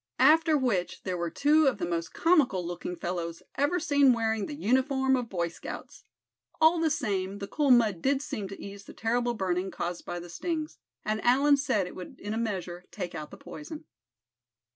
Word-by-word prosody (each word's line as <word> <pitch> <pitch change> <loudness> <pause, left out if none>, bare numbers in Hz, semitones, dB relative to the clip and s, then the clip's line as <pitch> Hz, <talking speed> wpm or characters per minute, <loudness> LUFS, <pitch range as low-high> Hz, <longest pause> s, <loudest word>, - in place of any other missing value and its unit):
After 310 +4 +5
which 225 -10 -1
there 185 -2 -2
were 170 -1 -2
two 295 - +4
of 265 - +2
the 180 - -2
most 170 -1 -2
comical 280 - +3
looking 175 +1 -4
fellows 170 -1 -4
ever 290 +6 +1
seen 285 -5 +4
wearing 225 -2 0
the 295 - -6
uniform 265 +1 +2
of 245 -3 -2
Boy 170 -3 -1
Scouts. 170 - -9 0.5
All 320 +2 +5
the 325 -1 +2
same, 200 -10 -1
the 200 - -5
cool 290 +3 0
mud 220 -8 +4
did 275 0 +2
seem 230 -11 -4
to 195 - -9
ease 200 0 -9
the - - -12
terrible 240 +1 0
burning 185 -2 -1
caused 175 -1 -4
by 175 - -5
the 175 - -9
stings, 310 - -4 0.3
and 215 0 -1
Allan 280 +4 +5
said 215 -9 +1
it - - -8
would 180 - -9
in 205 +1 -4
a - - -2
measure 180 -5 -3
take 180 -4 -5
out 155 -1 -6
the - - -11
poison. 310 +1 -9
225 Hz, 195 wpm, -28 LUFS, 180-285 Hz, 0.5 s, After